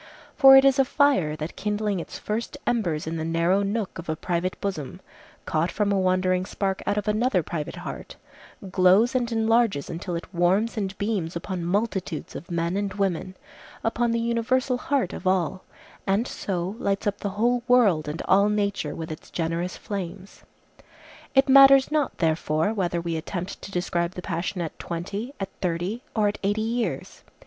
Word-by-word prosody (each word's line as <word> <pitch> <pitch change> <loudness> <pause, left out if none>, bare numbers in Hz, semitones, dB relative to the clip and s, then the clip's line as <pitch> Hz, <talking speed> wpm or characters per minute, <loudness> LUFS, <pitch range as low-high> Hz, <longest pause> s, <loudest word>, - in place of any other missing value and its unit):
For 270 -2 +9
it 270 - +6
is 275 0 +4
a - - +7
fire 265 - +2
that 155 +2 -6
kindling 210 -1 -1
its - - -7
first 220 +2 -4
embers 175 -10 0
in 165 +1 -3
the 160 - -3
narrow 165 +4 +2
nook 200 -2 -2
of 170 - -8
a 155 - 0
private 175 +3 -2
bosom, 185 -9 -4 0.5
caught 160 +3 0
from 205 +3 0
a 200 - +2
wandering 185 0 +2
spark 195 0 -2
out 205 - +1
of 210 0 -2
another 210 -3 +2
private 150 -2 -4
heart, - - -7 0.6
glows 190 +6 +4
and 245 -2 0
enlarges 225 - +2
until 175 +1 -4
it 170 - -4
warms 185 +7 +2
and 200 -3 -3
beams 200 -6 -2
upon 175 +1 -4
multitudes 190 -3 -2
of 165 - -8
men 170 +1 -1
and 200 -1 -2
women, 190 -2 -1 0.5
upon 235 +1 +1
the 230 0 +1
universal 245 +2 0
heart 270 -10 0
of - - -5
all, 185 -1 0 0.4
and 200 +6 +1
so 185 +1 -3
lights 195 +2 -1
up 205 -1 -1
the 200 - -2
whole 240 +2 +2
world 205 -12 +4
and 150 +3 -4
all 200 +2 +4
nature 200 -7 -1
with 160 0 -6
its 155 - -9
generous 170 +2 -2
flames. 195 -1 -6 0.9
It 270 +1 +5
matters 275 0 +7
not 300 -3 0
therefore 160 +2 +1
whether 175 -5 -1
we 170 -1 -2
attempt 180 +3 -5
to - - -8
describe 175 -1 -1
the 180 - -6
passion 175 +1 -3
at 165 - -5
twenty, 200 +10 -5
at 195 -1 -3
thirty, 180 +6 -2
or 215 -2 +3
at 205 - -2
eighty 205 +2 0
years. 235 +1 -3
195 Hz, 175 wpm, -25 LUFS, 170-225 Hz, 0.9 s, For